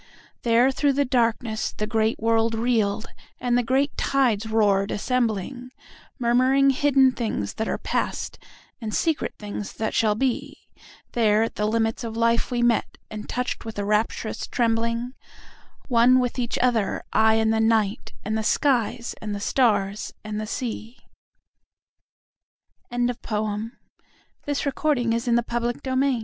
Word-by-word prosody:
There 240 +3 +4
through 280 +1 +1
the 285 +1 +1
darkness 230 -3 0
the 210 - -3
great 220 0 +1
world 225 0 +2
reeled, 220 -3 0 0.3
and 245 -1 +1
the 245 - +4
great 265 +4 +1
tides 235 -6 +1
roared, 205 -3 +2
assembling—Murmuring 250 +3 0
hidden 270 -1 +4
things 220 - -3
that 220 - -3
are - - -1
past, - - -3 0.4
and 215 -2 -3
secret 320 -3 0
things 205 -1 -6
that 220 -1 -3
shall 215 -2 +2
be; 255 +2 -2 0.4
There 220 -2 +3
at 225 - -3
the 210 - -1
limits 225 +1 0
of 225 -1 -5
life 230 0 +2
we 240 -2 0
met, 240 -2 +1
and 215 -1 -7
touched 250 0 -2
with 225 -1 -7
a 205 - -2
rapturous 215 +1 -1
trembling—One 235 +1 0
with 250 0 -1
each 240 -1 -1
other, 235 -5 +1
I 220 0 +4
and 220 0 +2
the 220 - +1
Night, 220 -1 +1
and 215 +1 -1
the 220 - 0
skies, 240 -1 +1
and 210 -1 -4
the - - -4
stars, 205 -3 +1
and 215 0 -4
sea. 230 -1 -5 1.9
Contents 245 0 -1
BIBLIOGRAPHIC 215 +6 -5
RECORD 290 +1 +1
Previous 235 0 0
Article 235 0 +1
Next 240 +2 -3
Article 260 0 +1
Shak 275 -1 +2
230 Hz, 140 wpm, -24 LUFS, 220-250 Hz, 1.9 s, There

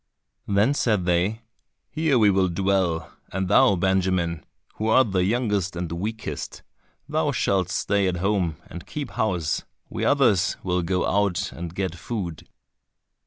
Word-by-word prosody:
Then 105 +7 +3
said 105 -10 +1
they, 90 +6 +1 0.5
"Here 155 -4 +2
we 105 -3 +5
will 95 -1 +2
dwell, 95 -2 0 0.2
and 95 0 -2
thou 100 - +5
Benjamin, 90 -3 0 0.3
who 110 - -2
art 110 0 +4
the 90 -1 +2
youngest 105 -3 0
and 85 -1 -4
weakest, 105 +6 -5 0.4
thou - - 0
shalt 95 -2 +1
stay 100 0 +1
at 90 -1 -1
home 95 -3 0
and 85 - -10
keep 145 -4 -5
house, 95 -9 -1 0.3
we - - -3
others 115 -10 +3
will 90 -1 0
go 90 +1 0
out 100 -1 0
and 85 0 -7
get 95 -3 -2
food." 85 -2 -6
95 Hz, 145 wpm, -24 LUFS, 90-105 Hz, 0.5 s, we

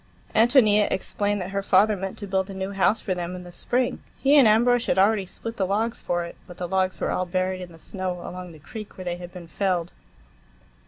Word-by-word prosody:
Ántonia 220 -3 +5
explained 205 +1 -1
that 180 +1 -5
her 200 0 -1
father 200 +2 +4
meant 195 0 -5
to 205 - -5
build 190 0 -1
a 195 - -7
new 190 +1 -3
house 200 +3 +2
for 190 - -2
them 180 0 -4
in 180 - -8
the 175 - -11
spring; 245 +7 -1 0.2
he 280 +2 +4
and 275 -6 +8
Ambrosch 240 +3 +4
had - - +1
already 200 0 +3
split 230 +5 -7
the 190 - 0
logs 220 +4 -1
for 175 0 -1
it, 170 - -9
but 175 - -11
the 180 - -3
logs 185 0 0
were - - -1
all 185 - -1
buried 185 +1 -1
in 180 -1 -8
the 165 - -14
snow, 185 +2 -4
along 180 0 -7
the 160 - -13
creek 215 +7 -10
where 185 - -7
they 175 0 -2
had 175 0 -9
been 180 -2 -9
felled. 180 -1 -1
190 Hz, 235 wpm, -25 LUFS, 180-210 Hz, 0.2 s, and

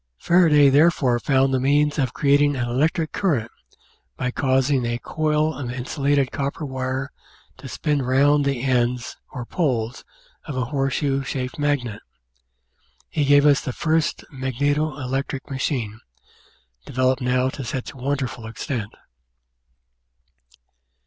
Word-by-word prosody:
Faraday 155 - +5
therefore 140 -5 +3
found 135 +1 +2
the 130 - +2
means 145 +3 +2
of 130 -4 +1
creating 145 +2 +3
an 120 -2 -2
electric 155 +6 0
The - - -4
Outline 195 -3 +2
of - - +1
Science 110 -1 -6 0.2
current - - -32 0.4
by 125 - -1
causing 130 0 +1
a 120 0 -1
coil 155 +3 0
of 130 -4 -5
insulated 135 +2 0
copper 140 +2 -3
wire 130 0 -3 0.5
to - - -10
spin 150 -2 -1
round 140 +3 +3
the 140 -3 -1
ends 125 -2 0
or 125 -2 -6
poles 125 -7 -1 0.4
of 145 -4 -5
a 125 - 0
horseshoe 135 +1 0
shaped 130 +2 -4
magnet. 135 -7 -1 1.1
He 150 - -2 0.2
us 145 -1 +4
the 135 - -4
tirst 160 +1 0
magneto 145 +3 -1
electric 135 +1 -4
machine, 125 -5 -2 0.8
developed 130 +1 0
now 125 +1 +1
to 135 - -6
such 125 +2 -5
'ul 130 -3 -3
extent. 110 0 -5
135 Hz, 135 wpm, -23 LUFS, 125-145 Hz, 1.1 s, Faraday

